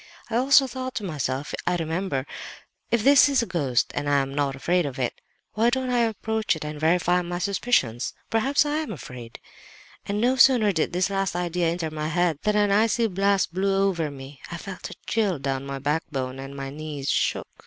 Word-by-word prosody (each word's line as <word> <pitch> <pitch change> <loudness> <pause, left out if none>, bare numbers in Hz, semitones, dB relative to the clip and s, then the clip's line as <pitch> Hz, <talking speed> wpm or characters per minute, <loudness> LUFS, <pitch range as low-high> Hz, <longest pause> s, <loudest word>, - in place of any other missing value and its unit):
I - - -1
also 270 +3 +5
thought 255 0 -5
to 215 - -3
myself, 145 -5 -3
I 175 - +2
remember—'if 165 - -4
this 280 +1 +7
is 275 -4 +2
a - - -2
ghost, 140 - 0
and 145 - -2
I 145 - +4
am 135 0 -6
not 140 -1 0
afraid 175 +6 +1
of 140 -3 -5
it, 125 -2 -3 0.3
why 225 +2 +3
don't 260 0 -1
I 245 - +2
approach 220 -2 0
it 155 - -6
and 150 0 -6
verify 175 +3 +2
my 175 0 -4
suspicions? 180 - 0 0.2
Perhaps 270 +7 +2
I 295 +1 0
am 310 -7 -3
afraid—' 125 - -9 0.7
And 200 +1 -1
no 250 +4 +2
sooner 245 -6 +6
did 160 -4 0
this 180 +2 0
last 195 -2 -1
idea 175 -1 0
enter 165 -1 -2
my 155 0 -3
head 165 -1 +1
than 210 0 +1
an 205 -1 +3
icy 225 +3 +3
blast 195 -2 +1
blew 195 +1 +1
over 165 -5 -2
me; 135 0 -11
I 170 - -4
felt 185 +2 -7
a - - -9
chill 210 -6 0
down 135 0 -3
my 140 0 -4
backbone 135 -2 -2
and 135 +1 -8
my 135 0 -5
knees 150 -2 -4
shook. - - 0
175 Hz, 200 wpm, -25 LUFS, 145-215 Hz, 0.7 s, this